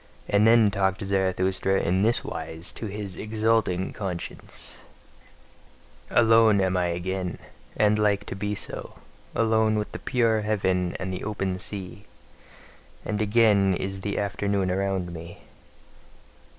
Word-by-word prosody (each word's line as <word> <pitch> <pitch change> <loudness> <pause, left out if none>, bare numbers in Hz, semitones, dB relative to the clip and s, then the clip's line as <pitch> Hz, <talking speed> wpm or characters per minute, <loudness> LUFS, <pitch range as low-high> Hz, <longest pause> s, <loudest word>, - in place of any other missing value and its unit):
And 105 +2 +4
then 115 -2 +6
talked 95 -1 0
Zarathustra 95 0 +1
in 95 +2 +1
this 115 +3 +3
wise 80 +1 -6
to 110 - -6
his 100 -2 -5
exulting 110 -4 0
conscience: 90 -4 -6 1.3
Alone 115 -2 +5
am 95 -1 +1
I 90 -1 +2
again, 90 +1 -3 0.4
and 105 0 +3
like 105 -1 +2
to - - -6
be 105 +1 -2
so, - - -6 0.4
alone 110 -1 +2
with 105 - -3
the - - -6
pure 115 -4 +1
heaven, 95 -4 0
and 95 0 -3
the 90 - -5
open 95 -3 -2
sea; 100 +1 -6 1.0
and 105 0 -2
again 105 -3 +4
is 95 +2 -4
the 100 +1 -3
afternoon 100 -2 0
around 95 -2 -1
me. 85 +1 -10
100 Hz, 130 wpm, -26 LUFS, 95-105 Hz, 1.3 s, then